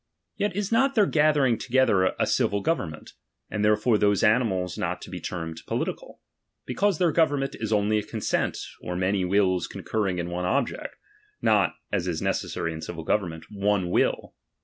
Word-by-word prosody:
Yet 205 Hz, -2 st, -1 dB
is 205 Hz, 0 st, -2 dB
not 270 Hz, +4 st, +3 dB
their 210 Hz, -3 st, +5 dB
gathering 150 Hz, -7 st, +3 dB
together 115 Hz, -7 st, +2 dB
a -, -, +3 dB
civil 100 Hz, 0 st, +1 dB
government, 85 Hz, -, -3 dB, 0.4 s
and 105 Hz, -, -1 dB
therefore 105 Hz, +1 st, +3 dB
those 100 Hz, -2 st, +2 dB
animals 105 Hz, -6 st, +2 dB
not -, -, -2 dB
to -, -, -10 dB
be -, -, -5 dB
termed 80 Hz, -2 st, -5 dB
political; -, -, -4 dB, 0.4 s
because 195 Hz, +8 st, +1 dB
their 175 Hz, -1 st, +3 dB
government 145 Hz, -4 st, +1 dB
is 110 Hz, -1 st, -3 dB
only 105 Hz, 0 st, +2 dB
a -, -, -4 dB
consent, 110 Hz, +1 st, -1 dB, 0.2 s
or 90 Hz, -, -4 dB
many 95 Hz, +1 st, +1 dB
wills 95 Hz, -1 st, +2 dB
con -, -, -9 dB
curring 100 Hz, -5 st, -1 dB
in 85 Hz, 0 st, -3 dB
one 90 Hz, +1 st, -2 dB
object, 90 Hz, -, -1 dB, 0.4 s
not -, -, +2 dB, 0.2 s
(as 95 Hz, -3 st, -1 dB
is 85 Hz, -3 st, -1 dB
necessary 85 Hz, -, -2 dB
in 80 Hz, -, -7 dB
civil 80 Hz, 0 st, -6 dB
government) 80 Hz, -3 st, -1 dB
one 100 Hz, -3 st, 0 dB
will. -, -, +1 dB
105 Hz, 170 wpm, -26 LUFS, 90-130 Hz, 0.4 s, their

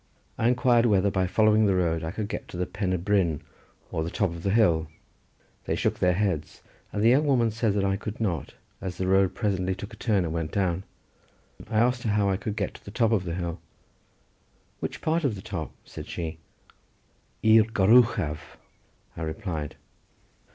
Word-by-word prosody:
I 115 Hz, -, +1 dB
inquired 120 Hz, -1 st, +4 dB
whether 100 Hz, -2 st, +3 dB
by 95 Hz, -1 st, +1 dB
following 110 Hz, +2 st, +4 dB
the 95 Hz, -, +2 dB
road 85 Hz, -3 st, +1 dB
I 80 Hz, -, -2 dB
could 105 Hz, +3 st, -4 dB
get 105 Hz, -, -5 dB
to -, -, -8 dB
the 90 Hz, -, 0 dB
Pen 95 Hz, +1 st, -3 dB
y 95 Hz, -, +1 dB
bryn 90 Hz, -4 st, +1 dB, 0.5 s
or 80 Hz, -, -1 dB
the 85 Hz, -, -3 dB
top 95 Hz, 0 st, 0 dB
of 85 Hz, 0 st, -7 dB
the 100 Hz, -, -1 dB
hill. 85 Hz, -7 st, +3 dB, 0.8 s
They -, -, 0 dB
shook -, -, -1 dB
their 90 Hz, 0 st, +3 dB
heads 95 Hz, -7 st, -2 dB, 0.3 s
and 105 Hz, -, -1 dB
the 115 Hz, -, +6 dB
young 145 Hz, +5 st, +4 dB
woman 120 Hz, -5 st, +3 dB
said 110 Hz, -1 st, 0 dB
that 100 Hz, -, +1 dB
I 95 Hz, 0 st, +1 dB
could 105 Hz, +2 st, -6 dB
not, 90 Hz, -10 st, -2 dB, 0.3 s
as 95 Hz, -2 st, -5 dB
the 95 Hz, -, -1 dB
road 95 Hz, 0 st, +3 dB
presently 95 Hz, -4 st, 0 dB
took 100 Hz, +4 st, -8 dB
a -, -, -8 dB
turn 100 Hz, -4 st, +1 dB
and 80 Hz, -, -3 dB
went 80 Hz, -1 st, -2 dB
down. 95 Hz, -1 st, 0 dB, 0.8 s
I 110 Hz, -, -1 dB
asked 120 Hz, +2 st, +3 dB
her 115 Hz, -, -2 dB
how 105 Hz, -1 st, +2 dB
I 95 Hz, -, 0 dB
could 105 Hz, 0 st, -4 dB
get 100 Hz, -3 st, -2 dB
to -, -, -14 dB
the -, -, -9 dB
top 115 Hz, +2 st, +1 dB
of 100 Hz, -5 st, +1 dB
the 85 Hz, -1 st, -3 dB
hill. 85 Hz, -1 st, -4 dB, 1.2 s
"Which -, -, -5 dB
part 160 Hz, +1 st, +1 dB
of 130 Hz, -7 st, +1 dB
the 95 Hz, -, -8 dB
top?" 80 Hz, -6 st, -5 dB
said -, -, -9 dB
she. 80 Hz, -1 st, -5 dB, 1.0 s
"I'r 110 Hz, 0 st, +7 dB
gor 105 Hz, -3 st, +1 dB
uchaf," 115 Hz, -12 st, +3 dB, 0.6 s
I -, -, -7 dB
replied. 80 Hz, -2 st, -4 dB
100 Hz, 200 wpm, -26 LUFS, 85-110 Hz, 1.2 s, I'r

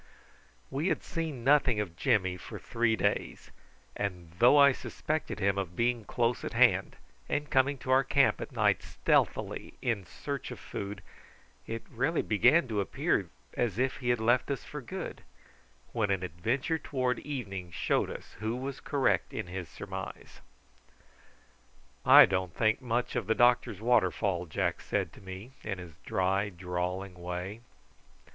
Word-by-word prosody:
We 145 Hz, +6 st, -1 dB
had -, -, 0 dB
seen 160 Hz, -7 st, -4 dB
nothing 135 Hz, -4 st, +4 dB
of 95 Hz, -5 st, -3 dB
Jimmy 95 Hz, -3 st, +2 dB
for 90 Hz, -, -8 dB
three 115 Hz, -1 st, +1 dB
days, 100 Hz, -1 st, -2 dB, 0.4 s
and 90 Hz, -5 st, -4 dB
though 125 Hz, +5 st, +7 dB
I 140 Hz, -1 st, +8 dB
suspected 155 Hz, +4 st, -3 dB
him 100 Hz, 0 st, +2 dB
of 90 Hz, -3 st, -4 dB
being 120 Hz, 0 st, 0 dB
close 120 Hz, 0 st, 0 dB
at -, -, -4 dB
hand, -, -, +4 dB, 0.3 s
and 150 Hz, 0 st, -1 dB
coming 135 Hz, +2 st, +3 dB
to 130 Hz, -, -4 dB
our 130 Hz, +1 st, +5 dB
camp 135 Hz, 0 st, +3 dB
at -, -, -6 dB
night -, -, +2 dB
stealthily -, -, 0 dB
in 110 Hz, -7 st, -1 dB
search 140 Hz, -3 st, -5 dB
of -, -, -7 dB
food, 100 Hz, 0 st, -6 dB, 0.6 s
it 115 Hz, 0 st, -4 dB
really 135 Hz, +8 st, 0 dB
began 125 Hz, +8 st, +4 dB
to 105 Hz, -2 st, 0 dB
appear 95 Hz, -, 0 dB, 0.2 s
as 115 Hz, -5 st, -1 dB
if 130 Hz, +1 st, 0 dB
he 125 Hz, -2 st, -3 dB
had 120 Hz, -1 st, +3 dB
left 120 Hz, +4 st, +2 dB
us 140 Hz, -, -2 dB
for 150 Hz, -, -7 dB
good, 185 Hz, +9 st, -6 dB, 0.7 s
when 110 Hz, -4 st, 0 dB
an 95 Hz, -2 st, 0 dB
adventure 120 Hz, -, -1 dB
towards 130 Hz, -4 st, -1 dB
evening 100 Hz, -11 st, -5 dB
showed -, -, 0 dB
us -, -, -9 dB
who 110 Hz, +2 st, -2 dB
was 135 Hz, +2 st, -5 dB
correct 140 Hz, -3 st, +1 dB
in -, -, -2 dB
his 90 Hz, -2 st, -6 dB
surmise. 95 Hz, -1 st, -8 dB, 1.6 s
"I -, -, +10 dB
don't 95 Hz, -3 st, -2 dB
think 110 Hz, +3 st, +2 dB
much 120 Hz, -1 st, -1 dB
of -, -, -1 dB
the 110 Hz, -, +2 dB
doctor's 120 Hz, -4 st, +3 dB
waterfall," 100 Hz, -6 st, +2 dB
Jack 85 Hz, +1 st, -1 dB
said -, -, -2 dB
to -, -, -14 dB
me, 95 Hz, +5 st, -9 dB
in 95 Hz, -, -4 dB
his 90 Hz, -3 st, -9 dB
dry 95 Hz, +2 st, +1 dB
drawling 90 Hz, +1 st, -3 dB
way. 90 Hz, +4 st, -5 dB
110 Hz, 155 wpm, -30 LUFS, 95-130 Hz, 1.6 s, I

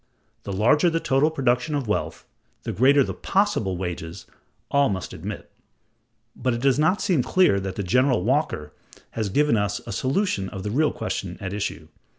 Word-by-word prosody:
The 100 Hz, -, -4 dB
larger 120 Hz, -, +3 dB
the 165 Hz, 0 st, 0 dB
total 135 Hz, 0 st, +2 dB
production 135 Hz, -1 st, 0 dB
of 140 Hz, -5 st, -2 dB
wealth, 105 Hz, -, -2 dB, 0.4 s
the -, -, -3 dB
greater 140 Hz, +4 st, +4 dB
the -, -, -4 dB
possible 190 Hz, -, 0 dB
wages, 85 Hz, -2 st, -5 dB, 0.5 s
all 140 Hz, -2 st, +3 dB
must 95 Hz, -3 st, -4 dB
admit; -, -, -7 dB, 0.8 s
but 130 Hz, -2 st, -1 dB
it 120 Hz, -, -5 dB
does 135 Hz, +1 st, +3 dB
not 185 Hz, +6 st, +2 dB
seem 170 Hz, -8 st, +2 dB
clear 175 Hz, -, +3 dB
that 95 Hz, -1 st, -5 dB
General 125 Hz, +2 st, +2 dB
Walker 120 Hz, -, -1 dB, 0.4 s
has 110 Hz, -3 st, -2 dB
given 145 Hz, +5 st, +2 dB
us 100 Hz, 0 st, -1 dB
a 115 Hz, -, -6 dB
solution 130 Hz, -, -1 dB
of 95 Hz, -, -7 dB
the 105 Hz, -, -3 dB
real 150 Hz, +5 st, +2 dB
question 100 Hz, -5 st, -4 dB
at 95 Hz, -1 st, -5 dB
issue. 85 Hz, -6 st, -4 dB
125 Hz, 170 wpm, -24 LUFS, 100-145 Hz, 0.8 s, greater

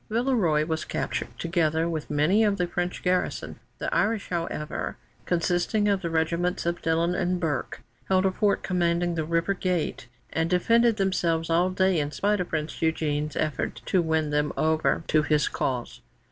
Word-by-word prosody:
Villeroy 215 Hz, -, +2 dB
was 160 Hz, 0 st, -2 dB
captured, -, -, -3 dB
together 165 Hz, -1 st, +1 dB
with 160 Hz, -3 st, -4 dB
many 155 Hz, +9 st, +3 dB
of 205 Hz, -2 st, +2 dB
the 180 Hz, -, +1 dB
French 175 Hz, +1 st, -3 dB
garrison. 180 Hz, 0 st, -1 dB, 0.2 s
The -, -, -3 dB
Irish, 215 Hz, -1 st, +1 dB
however, 165 Hz, -3 st, -3 dB, 0.3 s
consisting 175 Hz, +5 st, +1 dB
of 200 Hz, -2 st, +2 dB
the 170 Hz, -, -2 dB
regiments 170 Hz, +3 st, 0 dB
of 170 Hz, 0 st, -1 dB
Dillon 165 Hz, +2 st, +1 dB
and 180 Hz, 0 st, 0 dB
of 180 Hz, -, -1 dB
Burke, 160 Hz, -5 st, -2 dB, 0.3 s
held 190 Hz, 0 st, +3 dB
a 190 Hz, -, +3 dB
fort 200 Hz, +1 st, +1 dB
commanding 175 Hz, -1 st, +1 dB
the 160 Hz, -1 st, -1 dB
river 165 Hz, +4 st, +1 dB
gate, 180 Hz, -9 st, -2 dB, 0.3 s
and 160 Hz, +1 st, 0 dB
defended 230 Hz, +5 st, +3 dB
themselves 170 Hz, -4 st, 0 dB
all 175 Hz, +3 st, +3 dB
day, 185 Hz, -2 st, +2 dB
in 145 Hz, -1 st, -1 dB
spite 205 Hz, +8 st, 0 dB
of 180 Hz, -, -2 dB
Prince 155 Hz, 0 st, -2 dB
Eugène's 150 Hz, -2 st, -1 dB
efforts 155 Hz, -4 st, -2 dB
to 185 Hz, -, +2 dB
win 160 Hz, -2 st, 0 dB
them 150 Hz, 0 st, +1 dB
over 160 Hz, +1 st, +1 dB
to 155 Hz, -, +4 dB
his 150 Hz, -1 st, +2 dB
cause. 125 Hz, -2 st, -3 dB
170 Hz, 175 wpm, -26 LUFS, 160-185 Hz, 0.3 s, to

